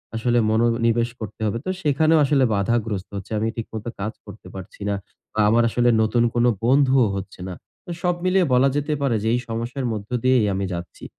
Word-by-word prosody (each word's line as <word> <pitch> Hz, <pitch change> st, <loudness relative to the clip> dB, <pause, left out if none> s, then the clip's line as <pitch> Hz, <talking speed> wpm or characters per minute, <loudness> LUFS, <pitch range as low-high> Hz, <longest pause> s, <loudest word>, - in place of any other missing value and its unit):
আসলে 120 Hz, +1 st, +1 dB
মনোনিবেশ 115 Hz, +1 st, +2 dB
করতে 110 Hz, 0 st, -8 dB
হবে। 110 Hz, +2 st, -1 dB
তো -, -, -2 dB
সেখানেও 155 Hz, +2 st, +3 dB
আসলে 135 Hz, -1 st, +3 dB
বাধাগ্রস্ত 105 Hz, -1 st, -1 dB
হচ্ছে। 100 Hz, +2 st, -9 dB
আমি 110 Hz, -, 0 dB
ঠিক 115 Hz, -, -5 dB
মতো 110 Hz, +1 st, -5 dB
কাজ 105 Hz, +3 st, -3 dB
করতে 100 Hz, -2 st, -12 dB
পারছি 95 Hz, +2 st, -10 dB
না। 100 Hz, -, 0 dB, 0.4 s
বা -, -, -4 dB
আমার 115 Hz, +2 st, +4 dB
আসলে 120 Hz, +1 st, +2 dB
নতুন 115 Hz, +2 st, +2 dB
কোন 120 Hz, 0 st, +2 dB, 0.2 s
বন্ধুও 130 Hz, -2 st, +4 dB
হচ্ছে 95 Hz, -1 st, -7 dB
না। 95 Hz, -, -5 dB, 0.3 s
তো 175 Hz, -, -7 dB
সব 180 Hz, -1 st, +1 dB
মিলিয়ে 185 Hz, 0 st, +3 dB
বলা 130 Hz, +2 st, +4 dB
যেতে 145 Hz, +1 st, -1 dB
পারে 135 Hz, -5 st, +1 dB
যে -, -, -1 dB
এই 125 Hz, -, +2 dB
সমস্যার 120 Hz, +4 st, -3 dB
মধ্য 105 Hz, -1 st, -6 dB
দিয়েই 130 Hz, -3 st, +4 dB
আমি 95 Hz, 0 st, -2 dB
যাচ্ছি। 85 Hz, 0 st, -8 dB
115 Hz, 200 wpm, -22 LUFS, 110-130 Hz, 0.4 s, আমার